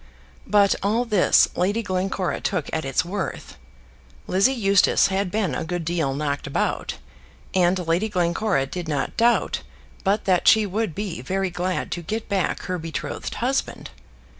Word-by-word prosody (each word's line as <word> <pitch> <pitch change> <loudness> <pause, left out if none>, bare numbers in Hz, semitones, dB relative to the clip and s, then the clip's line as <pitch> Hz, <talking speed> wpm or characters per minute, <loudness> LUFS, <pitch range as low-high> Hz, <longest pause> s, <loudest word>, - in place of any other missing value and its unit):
But 205 -1 +4
all 220 +5 +1
this 210 -5 +4
Lady 205 +6 0
Glencora 185 -4 -2
took 180 -7 -2
at 160 -2 -1
its 135 +5 0
worth. 190 +1 -5 0.7
Lizzie 195 +8 +3
Eustace 200 -5 +4
had 195 0 0
been 195 -6 -1
a 145 - -2
good 170 0 -3
deal 160 -5 0
knocked 145 -1 -2
about, - - -2 0.6
and 180 0 +2
Lady 175 +7 +1
Glencora 180 -3 +1
did 170 +5 -6
not 145 -3 -2
doubt 235 +1 +2 0.4
but 205 +2 +1
that 185 -2 +2
she 220 -1 +6
would 205 -2 -2
be 200 - -4
very 190 +6 -1
glad 180 +1 -2
to 175 - -3
get 220 +7 -4
back 195 -3 -1
her 180 -1 -3
betrothed 160 -1 -5
husband. - - -2
185 Hz, 155 wpm, -23 LUFS, 170-205 Hz, 0.7 s, she